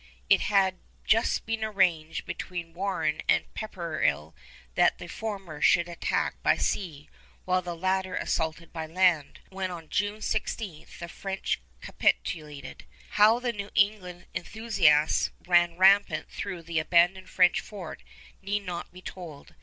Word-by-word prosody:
It - - +6
had 190 -2 +2 0.3
just 225 +1 +2
been 225 -1 -2
arranged 180 -7 +1
between 170 -2 -6
Warren 175 -5 -1
and - - +4
Pepperrell 160 - -2 0.4
that - - +3
the - - -8
former 195 -5 -6
should 170 +3 +4
attack 170 -1 -2
by - - +3
sea 155 -7 -2 0.4
while 185 0 +2
the 175 -1 -5
latter 185 +1 -1
assaulted 160 +1 -2
by 160 -1 -4
land, 170 -3 +2
when 190 -1 -3
on 165 -3 -8
June 205 +1 -1
16 205 -6 -3
the 170 - -7
French 195 +2 -3 0.2
capitulated. 150 -4 -2 0.3
How 215 +2 +6
the 245 -1 -2
New 200 -1 -6
England 195 -3 +1
enthusiasts 170 -5 +2 0.2
ran 175 -1 +3
rampant 190 -4 +4
through 185 -4 -5
the 165 0 -1
abandoned 175 +3 +3
French 180 -1 +4
fort 195 -6 -9 0.4
need 200 +1 -2
not 175 -2 -5
be 180 +1 -13
told. 165 -6 -9
180 Hz, 140 wpm, -28 LUFS, 165-200 Hz, 0.4 s, It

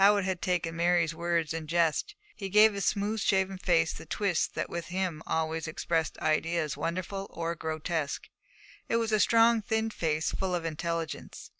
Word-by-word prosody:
Howitt 200 -1 +5
had 185 -2 -2
taken 175 -3 -1
Mary's 170 -1 +2
words 170 -1 0
in 165 -1 -5
jest. 170 - +1 0.2
He 195 -2 -5
gave 210 +2 +6
his 200 -2 -2
smooth 210 +2 0
shaven 190 -1 +1
face 165 -3 +2
the - - -10
twist 195 -5 0
that - - -1
with 170 -1 -5
him 180 -3 -2
always 160 0 -1
expressed 160 0 -1
ideas 155 -1 0
wonderful 185 +3 -3
or 170 0 -3
grotesque. 160 -2 -3 0.6
It - - +1
was 230 -1 +1
a 215 - +3
strong, 230 +1 +5
thin 220 +1 -1
face, 155 -5 -1
full 185 -2 -1
of 170 -1 -3
intelligence. 165 0 -4
170 Hz, 170 wpm, -29 LUFS, 165-200 Hz, 0.6 s, gave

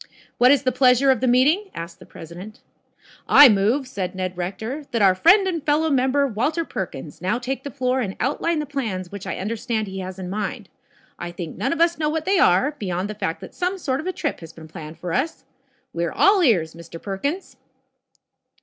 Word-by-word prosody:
"What 250 - +6
is 280 -1 +4
the 255 - +2
pleasure 260 +1 +4
of 255 - 0
the 260 - +1
meeting?" 295 +12 +3
asked 170 0 -7
the - - -15
president. 180 +6 -11 0.7
"I 290 -2 +9
move," 220 +7 +2
said 190 -7 -4
Ned 185 -1 -3
Rector, 210 +11 -4
"that 230 - -1
our 190 -1 +6
friend 375 - +5
and 335 -5 -2
fellow 310 +1 +1
member, 270 +1 +2
Walter 290 +8 -1
Perkins, 160 - -6
now 195 +6 0
take 255 +2 -4
the 285 - -5
floor 255 -1 -1
and 195 -5 -3
outline 315 +6 0
the 300 - -2
plans 220 -11 -4
which 200 -1 -8
I - - -3
understand 220 +2 -2
he 190 -1 -7
has 185 0 -6
in 185 -1 -6
mind. 205 +1 -4 0.5
I 175 - -5
think 175 -2 -7
none 265 - -1
of 330 - -2
us 335 -1 +2
know 305 -1 +1
what 315 0 -2
they 385 -1 +2
are, 190 +11 +4
beyoud 185 0 -3
the - - -3
fact 190 -6 -4
that - - -10
some 365 +1 -2
sort 270 -7 -2
of 315 - -5
a - - 0
trip 300 -5 -3
has 165 -1 -11
been 160 -1 -12
planned 155 0 -9
for 175 -2 -5
us. 270 +2 -2 0.5
We 170 - -2
are 165 - -3
all 395 -1 +4
ears, 180 - +2
Mr. 170 0 -11
Perkins." 280 - -4
235 Hz, 215 wpm, -22 LUFS, 185-290 Hz, 0.7 s, I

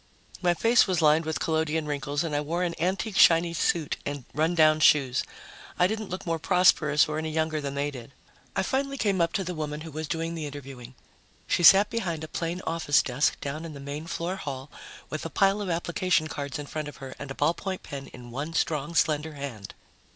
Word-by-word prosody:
My 175 -1 +2
face 230 +7 +4
was 185 -3 +1
lined 155 0 +4
with 160 0 -2
collodion 160 -1 0
wrinkles 145 0 -2
and 155 -3 -2
I 145 - +1
wore 170 +4 -2
an 175 -1 -1
antique 190 +3 -1
shiny 170 0 +6
suit 160 -2 0
and 145 -3 -5
rundown 155 +1 +3
shoes. 135 -5 +4 0.6
I 180 - +4
didn't 215 +1 -2
look 185 - -5
more 165 -1 -1
prosperous 160 -4 +4
or 155 0 -2
any 160 0 -3
younger 160 -1 -1
than 140 -1 -4
they 145 +1 -1
did. 125 -1 -10 0.4
I - - +1
finally 275 +1 -1
came 200 -7 +1
up 165 0 +2
to 195 - 0
the 180 0 -4
woman 150 -2 -4
who 160 0 -8
was 155 +1 -5
doing 165 +1 -2
the 160 -3 -4
interviewing. 135 -3 -9 0.5
She - - 0
sat 195 +4 +8
behind 175 -9 -2
a - - -5
plain 170 +3 -3
office 160 -3 +2
desk 130 +3 0
down 145 +3 -4
in 165 -2 -7
the - - -8
main 145 +3 -6
floor 170 +3 -3
hall, 140 -3 -6 0.4
with 155 - -4
a 165 - -4
pile 195 +5 +2
of 200 - -3
application 170 -1 0
cards 145 -1 -5
in 145 - -6
front 155 +1 -5
of 145 - -9
her 135 -1 -8
and 140 - -7
a 135 - -6
ballpoint 175 +5 -1
pen 140 -1 -7
in 120 -1 -12
one 145 +6 -4
strong, 155 0 -1
slender 155 0 +1
hand. 135 -8 -7
155 Hz, 215 wpm, -27 LUFS, 145-170 Hz, 0.6 s, sat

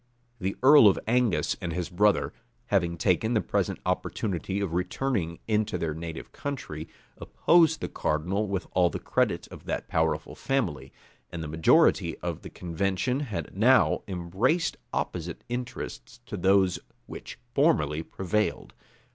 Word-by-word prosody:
The 95 0 -2
earl 140 -4 +9
of 95 - +4
Angus 120 -5 +2
and 85 -2 -3
his 90 0 -2
brother, 105 +3 +2 0.4
having 85 -3 +2
taken 105 +7 +1
the - - +4
present - - -1
opportunity 95 -1 -2
of 100 -5 -2
returning 90 -1 -1
into 110 -3 +1
their 80 -3 -2
native 80 0 -7
country, 125 - -5 0.3
opposed 165 -2 +3
the - - -2
cardinal 90 +8 -1
with 95 -1 -2
all 90 -1 +3
the - - -4
credit - - 0
of - - -12
that - - -3
powerful 80 -1 0
family; 90 - -2 0.4
and 85 -1 -5
the - - -5
majority 80 +2 +3
of - - -4
the - - -9
convention 95 +8 -1
had 115 -11 -5
now 125 +6 +4
embraced 95 - 0 0.2
opposite 85 -1 -3
interests 120 - -6
to 110 - -6
those 95 0 +3 0.3
which - - -9 0.2
formerly 75 +1 +2
prevailed. 95 +5 -2
95 Hz, 140 wpm, -27 LUFS, 85-110 Hz, 0.4 s, earl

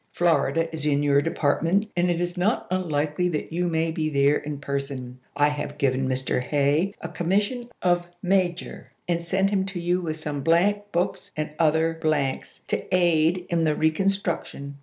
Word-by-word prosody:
Florida 165 -1 +2
is 155 -2 -5
in 145 -1 +2
your 140 -1 +4
depart 160 -2 0
ment, 200 +6 +1
and 175 0 +2
it 170 -1 0
is 175 0 -2
not 190 +6 +1
unlikely 165 -1 0
that 160 -1 -4
you 175 +1 0
may 165 -1 0
be 155 -1 -1
there 140 0 +3
in 150 -1 -5
person. 140 -3 -4 0.2
I 145 +1 +4
have 145 0 -5
given 130 -1 +1
Mr. 130 -1 0
Hay 145 +8 +1
a - - -4
commission 205 +8 -1
of 175 -1 +2 0.2
major, 185 -1 0 0.2
and 170 -1 0
sent 190 +3 +1
him 195 -2 +2
to 195 -2 -5
you 175 +1 0
with 160 -2 -3
some 150 -2 -4
blank 205 +7 +2
books 190 +3 -2
and 155 0 -2
other 160 0 +2
blanks, 150 -4 -1
to - - -1
aid 175 0 +3
in 170 -2 +1
the 155 -1 +2
reconstruction. 160 -4 -1
165 Hz, 180 wpm, -25 LUFS, 145-180 Hz, 0.2 s, your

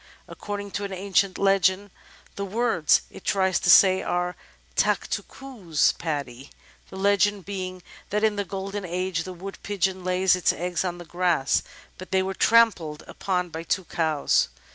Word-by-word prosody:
According 205 -1 -6
to 205 - -3
an 200 - -4
ancient 190 0 0
legend, 195 0 +2 0.4
the 200 - -4
words 200 -5 +2
it - - -12
tries 190 -2 +1
to - - -1
say 185 +1 +7
are: 180 0 -2 0.4
"Tak - - +1
two - - -2
coos, 215 - -1
Paddy," 140 -5 -5 0.4
the - - -11
legend 200 0 +2
being 185 -2 -5 0.3
that 210 +1 -1
in 215 -1 +3
the 205 - -1
Golden 195 +1 -5
Age 180 -1 -2
the 185 - -6
Wood 195 +3 -9
Pigeon 190 -2 -1
laid 185 +1 +3
its 180 - +2
eggs 175 +1 -2
on 175 -2 -3
the 175 - -10
grass, 175 -4 +1 0.4
but 185 - -9
they 190 0 +2
were 190 0 -3
trampled 190 -9 +3
upon 180 -2 -2
by 160 0 -6
two 185 +3 -1
cows. 155 - +1
185 Hz, 165 wpm, -25 LUFS, 175-200 Hz, 0.4 s, say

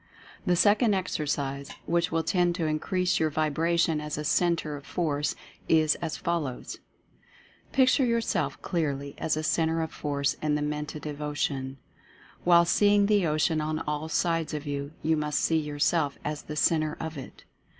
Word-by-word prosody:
The 180 - +4
second 205 +3 +4
exercise, 145 -6 -2 0.2
which 170 +1 +1
will 165 0 +1
tend 175 +1 +1
to 170 -3 -1
increase 180 +4 0
your 160 - +2
vibration 160 +1 +1
as 150 -1 -4
a 150 - -3
Centre 165 -1 +1
of 145 - -9
Force, 150 -3 -1 0.3
is 155 -1 +4
as 165 -2 -3
follows: 165 -8 -3 0.9
Picture 265 +1 +4
yourself 235 -2 0
clearly 140 -5 -2
as 155 -1 0
a 155 - -2
Centre 160 0 +1
of 160 - -5
Force 140 -1 -1
in 150 -1 +1
the 150 - -1
Mentative 150 0 -4
Ocean. 140 -2 -2 0.7
While 170 -1 +6
seeing 205 +3 +4
the 205 -4 +3
Ocean 155 +1 +1
on 155 +1 -1
all 150 +1 -3
sides 165 -2 0
of 150 0 -5
you, 140 0 -4
you 160 0 +3
must 150 -1 -1
see 160 - +2
yourself 150 0 0
as 150 0 -3
the 150 - -7
Centre 155 0 +1
of 160 0 -5
it. 135 -3 -10
155 Hz, 160 wpm, -27 LUFS, 150-170 Hz, 0.9 s, While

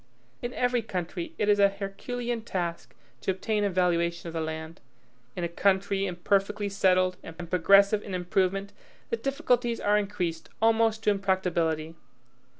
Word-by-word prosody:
In 240 - -3
every 245 -1 +1
country 215 - -4
it 210 - 0
is 205 -1 +4
a 200 0 +6
herculean 230 +5 -4
task 175 -6 -4 0.2
to - - -4
obtain 210 +3 0
a 200 - +2
valuation 170 -2 +1
of 165 - -6
the 165 - -2
land; 160 +1 -5 0.5
in 175 - -3
a - - +1
country 195 +2 +1
imperfectly 200 +3 0
settled 185 -2 +2
and 165 +1 -9
progressive 200 +4 +5
in 195 -3 -5
improvement, 190 +2 0 0.4
the 465 - +1
difficulties 245 - 0
are 210 +1 +3
increased 180 -5 -3
almost 225 0 +3
to 210 - +4
impracticability. 175 -5 0
195 Hz, 150 wpm, -28 LUFS, 175-210 Hz, 0.5 s, a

